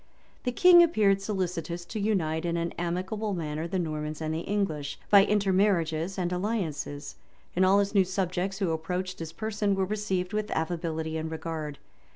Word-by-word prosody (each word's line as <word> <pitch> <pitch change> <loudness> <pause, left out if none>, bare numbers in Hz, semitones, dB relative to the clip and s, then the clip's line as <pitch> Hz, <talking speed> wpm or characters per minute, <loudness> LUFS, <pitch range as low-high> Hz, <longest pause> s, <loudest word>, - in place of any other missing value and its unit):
The 250 - +1
king 350 +6 +8
appeared 210 - +3
solicitous 180 -4 -3
to 215 - -5
unite 175 -7 0
in 170 -1 -1
an 170 0 -1
amicable 190 +5 -2
manner 155 -1 -3
the 185 - -2
Normans 155 -3 -3
and 155 0 -2
the 160 - -1
English, 160 -8 -2
by 200 -1 +9
intermarriages 190 -4 +1
and 180 -1 -1
alliances; 180 -7 -3 0.4
and 185 - +3
all 190 +2 +5
his 200 0 +1
new 195 -2 +5
subjects 185 0 -2
who 190 -4 0
approached 180 +3 -3
his 165 -1 -5
person 210 +1 -1
were 190 0 +1
received 195 -2 -2
with 215 0 -1
affability 160 -1 -2
and 160 0 -3
regard. 160 -2 -5
180 Hz, 170 wpm, -28 LUFS, 160-200 Hz, 0.4 s, by